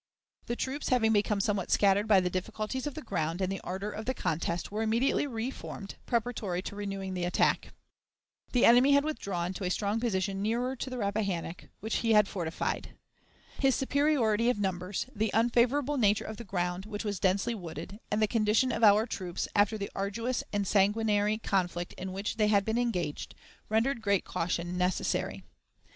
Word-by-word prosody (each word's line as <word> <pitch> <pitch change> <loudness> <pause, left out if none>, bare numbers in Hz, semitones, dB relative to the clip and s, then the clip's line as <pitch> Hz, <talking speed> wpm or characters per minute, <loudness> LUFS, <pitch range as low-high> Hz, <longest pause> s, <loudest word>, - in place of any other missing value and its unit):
The 240 - -1
troops, 265 +4 -3
having 225 -3 +3
become 205 0 +2
somewhat 200 -2 0
scattered 200 +1 +3
by 205 -3 +6
the 180 - 0
difficulties 215 +8 -3
of 290 - -5
the 310 - -6
ground 165 -5 -2
and 190 0 0
the 195 - -3
ardor 195 +3 -4
of 215 +1 -6
the 260 - -1
contest, 170 0 -2
were 210 +2 -2
immediately 230 +6 +1
reformed, 225 -4 -5
preparatory 220 -6 -1
to 200 - -6
renewing 195 -2 -4
the 180 -1 -2
attack. 175 - +1 0.8
The 245 - +4
enemy 250 +4 +7
had 280 0 +5
withdrawn 190 - -3
to 190 - -6
a 180 - 0
strong 205 +3 0
position 195 -4 -1
nearer 240 +5 0
to 260 - -5
the 255 - -5
Rappahannock, 200 -5 -2 0.2
which 220 +2 -1
he 225 -1 +2
had 210 -2 +6
fortified. 170 -5 -3 0.6
His 270 -2 +3
superiority 260 -5 +2
of 250 - +1
numbers, 185 -1 -2
the 220 +1 +1
unfavorable 245 +5 +2
nature 210 -2 +3
of 220 - -6
the 235 - -8
ground, 180 0 -2
which 210 0 -5
was 205 -3 -2
densely 195 +5 +1
wooded, 175 0 -7
and 210 - 0
the 215 - +3
condition 220 +3 +2
of 230 - -2
our 210 +1 +6
troops, 185 -6 -4
after 205 +1 +3
the 200 -1 -5
arduous 230 +6 -2
and 205 -2 0
sanguinary 210 +1 +2
conflict 175 -5 -1
in 185 0 -6
which 200 +4 -3
they 215 -1 +3
had 200 -2 +3
been 225 +2 0
engaged, 180 -11 -2 0.3
rendered 230 +3 +1
great 200 -3 +1
caution 175 +1 -2
necessary. 180 0 -1
210 Hz, 180 wpm, -30 LUFS, 190-230 Hz, 0.8 s, enemy